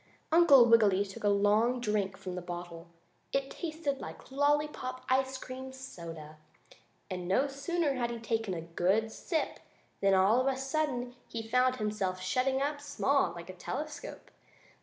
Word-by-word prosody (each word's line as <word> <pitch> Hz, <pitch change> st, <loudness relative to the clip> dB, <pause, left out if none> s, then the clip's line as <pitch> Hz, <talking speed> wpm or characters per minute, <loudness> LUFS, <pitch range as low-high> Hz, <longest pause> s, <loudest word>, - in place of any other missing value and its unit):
Uncle 305 Hz, -7 st, +8 dB
Wiggily 210 Hz, -4 st, +5 dB
took 195 Hz, +1 st, -10 dB
a 205 Hz, -, +4 dB
long 210 Hz, +5 st, +3 dB
drink 210 Hz, -5 st, -1 dB
from 185 Hz, -, -6 dB
the 180 Hz, -, -4 dB
bottle. 175 Hz, -1 st, -7 dB, 0.4 s
It 275 Hz, 0 st, -1 dB
tasted 310 Hz, -4 st, -3 dB
like -, -, -9 dB
lollypop 285 Hz, -2 st, 0 dB
ice 265 Hz, 0 st, +2 dB
cream 260 Hz, +1 st, -7 dB
soda, 165 Hz, -, -9 dB, 0.7 s
and 180 Hz, -1 st, -4 dB
no 195 Hz, +9 st, +3 dB
sooner 285 Hz, +2 st, -1 dB
had 245 Hz, -3 st, -1 dB
he 235 Hz, -, -4 dB
taken 225 Hz, -4 st, -2 dB
a 165 Hz, -, -4 dB
good 185 Hz, +7 st, +1 dB
sip 320 Hz, +5 st, -2 dB, 0.4 s
than 195 Hz, -1 st, +4 dB
all 200 Hz, +6 st, +4 dB
of 260 Hz, -, 0 dB
a 260 Hz, -, -4 dB
sudden 265 Hz, -3 st, -2 dB
he 225 Hz, -1 st, -5 dB
found 255 Hz, +2 st, +3 dB
himself 210 Hz, -5 st, -2 dB
shutting 260 Hz, +8 st, +1 dB
up 290 Hz, 0 st, -2 dB
small, 280 Hz, -1 st, +1 dB
like 170 Hz, +1 st, -8 dB
a -, -, -12 dB
telescope. 295 Hz, -, -6 dB
240 Hz, 160 wpm, -31 LUFS, 190-270 Hz, 0.7 s, Uncle